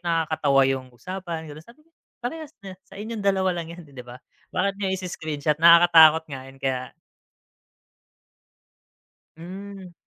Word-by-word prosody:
nakakatawa 155 -5 +1
yung 130 -1 -1
usapan 175 +1 -6
gano'n. 150 0 -10
Sabi 250 +6 -20
ko, 330 - -36 0.3
parehas 315 +3 -6
na 190 - -7 0.2
sa - - -14
inyong 220 +2 -6
dalawa 190 -2 +1
lang 165 - -8
'yan, 170 +1 -10
'di 140 -4 -12
ba? 125 0 -11 0.3
Bakit 200 +2 -1
nga 195 - -1
i-screenshot, 155 -5 -3
nakakatakot 165 -2 +7
nga 135 - -5
yun 135 - -15
kaya 130 -1 -3 2.4
Hmm. 190 +2 -10
170 Hz, 135 wpm, -24 LUFS, 150-190 Hz, 2.4 s, nakakatakot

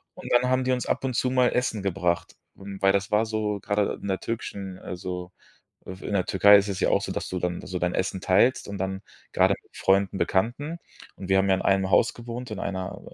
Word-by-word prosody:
Und - - -8
dann 125 +1 +4
haben 130 0 +2
die 130 - +1
uns 125 - -2
ab - - -1
und 130 -3 -2
zu 130 - +1
mal 125 -1 +4
Essen 115 -5 -1
gebracht. 90 -2 -1 0.2
Und 100 0 -9
weil, 95 - +5
das 100 0 -1
war 105 +2 +3
so, 105 -2 -2
gerade 105 -1 0
in - - -6
der 95 - 0
türkischen, 100 -5 -5
also 90 0 -6 0.6
f 95 0 -8
in - - -5
der 95 -3 +2
Türkei 100 +2 +7
ist 100 +1 -1
es 95 -1 -3
ja - - +2
auch - - +2
so, - - -4
dass - - -4
du 90 - -3
dann 90 -1 -2
so 90 0 -3
dein 90 0 0
Essen 95 0 -1
teilst 100 +6 +3
und 100 - -5
dann 95 0 -3 0.3
gerade - - +4
mit - - -21
Freunden, 95 0 +2
Bekannten. 135 - -1 0.4
Und 95 - -8
wir 95 - +4
haben 95 +1 +2
ja 95 - +5
in - - -3
einem 95 -1 +2
Haus 115 - +4
gewohnt, 120 +1 -7
in 100 - -5
einer 95 -1 -4
100 Hz, 240 wpm, -26 LUFS, 95-115 Hz, 0.6 s, Türkei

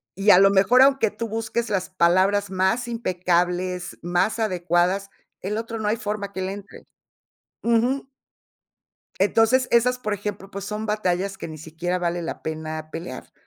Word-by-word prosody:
Y 195 +3 +4
a 180 - +8
lo 195 0 +7
mejor, 200 +6 +5
aunque 270 -5 +4
tú 230 +2 -5
busques 225 +1 -2
las 190 -3 -1
palabras 185 +3 +3
más 190 +6 0
impecables, 180 -4 -1
más 180 +6 0
adecuadas, 185 -1 0 0.3
el 205 +3 -3
otro 225 0 -4
no 215 - -2
hay 215 - +2
forma 205 -2 -4
que 190 - -4
le 190 +1 -2
entre. 200 0 -12 0.7
Ujú. 240 +4 +1 1.1
Entonces, 225 +6 +3
esas, 250 +2 +3
por 215 -3 -2
ejemplo, 205 -1 -5
pues, 200 0 -6
son 210 +1 -4
batallas 195 -2 -1
que - - -6
ni 155 -1 -8
siquiera 165 +4 -3
vale 175 0 -1
la 165 - -5
pena 155 0 -5
pelear. 165 +2 -7
195 Hz, 160 wpm, -23 LUFS, 180-220 Hz, 1.1 s, a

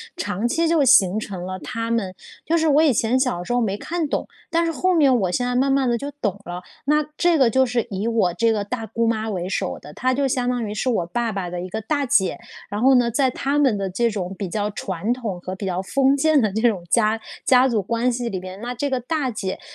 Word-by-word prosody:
长 205 +3 -2
期 330 +7 +1
就 330 -1 +2
形 215 -6 +5
成 190 -4 -6
了 185 0 -5
她 230 +10 -4
们 210 -5 -1 0.3
就 335 +2 +2
是 320 -1 +2
我 295 +2 +5
以 295 -5 +4
前 235 +3 +1
小 250 -10 0
时 210 - -6
候 245 - +2
没 205 -2 -1
看 335 +3 -3
懂， - - -2 0.2
但 335 0 +1
是 330 - 0
后 370 +3 +1
面 285 -6 +4
我 185 -3 0
现 245 +6 0
在 250 - -1
慢 270 +2 +2
慢 270 -2 +2
地 235 - +1
就 280 +3 -5
懂 200 0 -1
了。 175 +1 -6 0.2
那 300 +2 +3
这 345 -2 +3
个 255 -4 +4
就 260 +3 +3
是 245 -1 -1
以 200 +2 -3
我 220 -7 +1
这 230 +5 +2
个 205 - -1
大 225 +2 -4
姑 230 +1 -1
妈 220 -1 -1
为 180 -3 -3
首 190 -2 -2
的， 150 - -12
她 255 +1 0
就 280 +2 0
相 250 -1 0
当 245 -3 -1
于 205 - -4
是 255 +4 -1
我 180 -8 0
爸 235 +4 -1
爸 185 -3 -3
的 175 0 -5
一 185 - -5
个 220 +4 -4
大 285 +5 -1
姐， 190 -6 +2 0.3
然 205 +2 -3
后 265 +1 +5
呢， 240 -1 +3
在 260 +2 +2
她 280 +3 -1
们 260 -8 +3
的 195 -1 -2
这 235 +5 +1
种 195 -3 -4
比 195 - -3
较 205 +3 -2
传 195 +2 -3
统 225 -7 -4
和 185 - -5
比 195 - -6
较 185 0 -1
封 275 +7 +2
建 310 0 +3
的 215 - +2
这 220 - -1
种 195 -6 -3
家 220 -1 +2 0.3
家 255 0 +5
族 225 -5 +1
关 235 +4 0
系 240 -1 -3
里 185 - -3
边， 185 +1 -9
那 245 +1 -4
这 285 +4 -2
个 260 -1 0
大 285 0 -1
姐 195 -3 -4
230 Hz, 285 characters per minute, -22 LUFS, 200-265 Hz, 0.3 s, 形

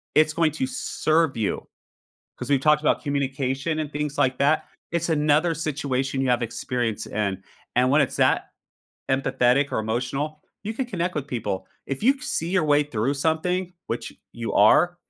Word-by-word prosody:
it's 155 0 +4
going 160 -1 +2
to 130 - -1
serve 155 +2 0
you, 105 -3 -2 0.7
'cause 125 +2 -6
we've 140 -2 +4
talked 150 +1 +4
about - - +2
communication 140 +1 -1
and 150 -2 -3
things 150 0 -3
like 130 -1 +2
that. 145 +3 +2 0.2
It's 170 0 0
another 155 +2 +3
situation 135 -4 -2
you 130 - 0
have 125 -1 +2
experience 115 -2 -2
in, 100 -2 -2 0.3
and 125 +1 +4
when 145 - +5
it's 130 - -2
that - - +2 0.6
empathetic 135 +1 +2
or - - 0
emotional, 135 +7 -3 0.2
you 215 - -3
can 260 +2 -2
connect 180 -5 -2
with 145 -2 -3
people. 115 -7 -3 0.2
If 135 +7 -4
you 265 +4 +5
c 270 - -17
see 165 - -2
your 185 -3 +2
way 150 0 +4
through 130 0 -1
something, 170 +5 0
which 115 - -4 0.2
you 115 -1 -4
are, 175 +12 +5
145 Hz, 175 wpm, -24 LUFS, 125-155 Hz, 0.7 s, when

